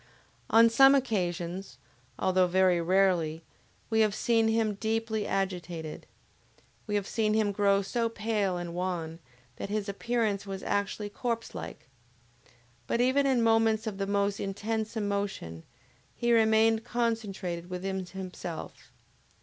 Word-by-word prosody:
On 230 +1 +7
some 270 +4 +7
occasions, 185 -7 -2 0.4
although 185 -1 +2
very 180 -1 +3
rarely, 170 -3 +2 0.5
we 220 - +3
have 215 -2 +3
seen 225 -1 +2
him 220 -1 +1
deeply 220 0 -2
agitated. 175 -5 -3 0.8
We 210 - -1
have 205 -2 0
seen 215 0 0
him 215 -2 +2
grow 200 -1 +2
so 230 +3 -1
pale 215 -4 -1
and 175 -1 -5
wan, 170 -2 -3 0.4
that - - -5
his 210 0 -2
appearance 215 0 -1
was 195 -1 -5
actually 205 +1 -2
corpse 230 +2 -3
like. - - -8 1.0
But 235 - 0
even 260 +3 +3
in 255 -3 +2
moments 225 -1 +3
of 205 -3 -4
the 195 - -1
most 200 0 0
intense 220 +3 -3
emotion, 200 - -3 0.5
he 240 -1 +1
remained 220 0 +4
concentrated 205 -8 -2
within 190 +1 -3
himself. 180 -2 -8
205 Hz, 130 wpm, -29 LUFS, 185-225 Hz, 1.0 s, On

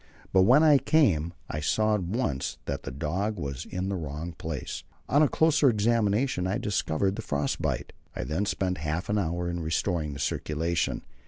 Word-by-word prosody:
But 95 - +6
when 140 +5 +7
I 150 -3 +7
came, 95 - +3 0.2
I 75 - -3
saw 110 +8 +2
at 105 - +1
once 90 - -2
that 70 0 -3
the 70 - -6
dog 95 +10 -2
was 70 -6 -4
in 90 +1 -3
the 100 - -1
wrong 80 0 -5
place. 80 -4 -5 0.2
On 145 +3 +4
a 150 - +5
closer 155 -3 +4
examination 110 -2 +1
I 95 - 0
discovered 95 -1 0
the - - -3
frost 70 -1 -2
bite. - - -2 0.2
I - - -3
then 80 +11 -1
spent 90 -3 -1
half 80 +3 -3
an 105 0 +2
hour 85 -1 -1
in 85 0 -2
restoring 80 -1 -1
the 70 - -8
circulation. 80 +4 -1
90 Hz, 185 wpm, -28 LUFS, 75-105 Hz, 0.2 s, when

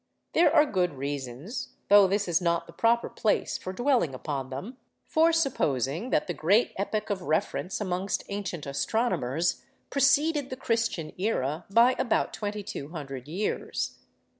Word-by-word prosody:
There 330 -2 +5
are 305 -1 +6
good 180 - 0
reasons, 140 - -5
though 205 -1 +7
this 200 +1 0
is 175 0 +2
not 170 -1 +1
the - - -14
proper 230 +6 +2
place 215 - 0
for 185 - -5
dwelling 240 - +1
upon 135 -1 -4
them, 190 - -7 0.3
for 325 +1 +4
supposing 170 - 0
that - - +2
the 175 - -3
great 200 +9 +2
epoch 210 +2 -2
of 195 -2 -2
reference 165 +1 -1
amongst 185 -1 -2
ancient 200 -6 -4
astronomers 165 - 0 0.3
preceded 280 +1 +3
the 255 - -4
Christian 225 -11 -1
era 165 -6 -1
by 235 +5 +5
about 240 - +1
2200 155 - -5
years. 185 +7 -3
190 Hz, 140 wpm, -28 LUFS, 155-235 Hz, 0.3 s, though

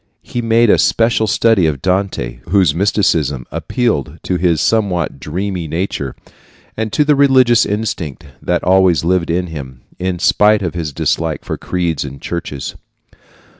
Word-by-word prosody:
He 120 - -4
made 115 -1 +3
a - - +4
special 115 -1 +2
study 105 -4 +3
of 75 -3 -2
Dante, 90 -10 -1
whose 95 -5 +3
mysticism 80 - +1
appealed 80 - -1
to 90 - -1
his 85 -3 +1
somewhat 90 -10 0
dreamy 90 +4 -4
nature, 80 -5 -3 0.6
and 110 -1 -3
to 150 - +2
the 150 0 +4
religious 130 -4 +4
instinct 95 -8 -3 0.2
that 90 -1 -1
always 90 -4 +3
lived 90 -1 +1
in 90 +2 0
him, 70 -7 -8 0.2
in 90 -1 -2
spite 105 +3 +3
of 85 - -2
his 85 -3 -4
dislike 80 +2 -2
for - - -3
creeds 85 -4 -2
and 70 -1 -8
churches. 80 -6 -5
90 Hz, 150 wpm, -16 LUFS, 80-105 Hz, 0.6 s, a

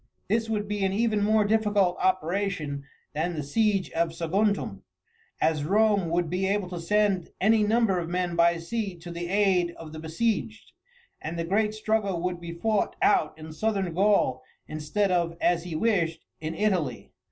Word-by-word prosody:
This 225 +2 +1
would 210 -2 -1
be 205 -1 -2
an 190 - +2
even 215 -1 +1
more 215 +1 +3
difficult 205 -4 +2
operation 180 -5 -1 0.3
than 165 +3 -1
the 150 - -3
siege 200 +5 +1
of 165 0 0
Saguntum, 185 - 0 0.6
as 155 -2 +1
Rome 200 +1 +2
would 170 +1 +1
be 185 +4 -1
able 200 -1 0
to 175 -1 -5
send 195 0 +1
any 215 +2 +4
number 215 -3 +2
of 170 -1 -4
men 180 -1 -1
by 170 0 +4
sea 195 +3 -3
to 170 +1 -9
the 170 0 -5
aid 185 -3 +2
of 160 -1 -10
the 155 - -7
besieged, 215 +7 -2 0.5
and 165 +2 -5
the 165 - -1
great 210 +4 +1
struggle 215 -4 0
would 180 -1 -2
be 170 -1 -6
fought 205 +5 0
out 390 - +2
in 155 0 -9
Southern 195 -1 -1
Gaul 190 -9 +2 0.3
instead 155 +6 -1
of, 170 -2 0
as 175 -1 +1
he 170 -3 -5
wished, 165 -5 0
in 155 +1 -4
Italy. 175 - -1
185 Hz, 175 wpm, -27 LUFS, 165-210 Hz, 0.6 s, any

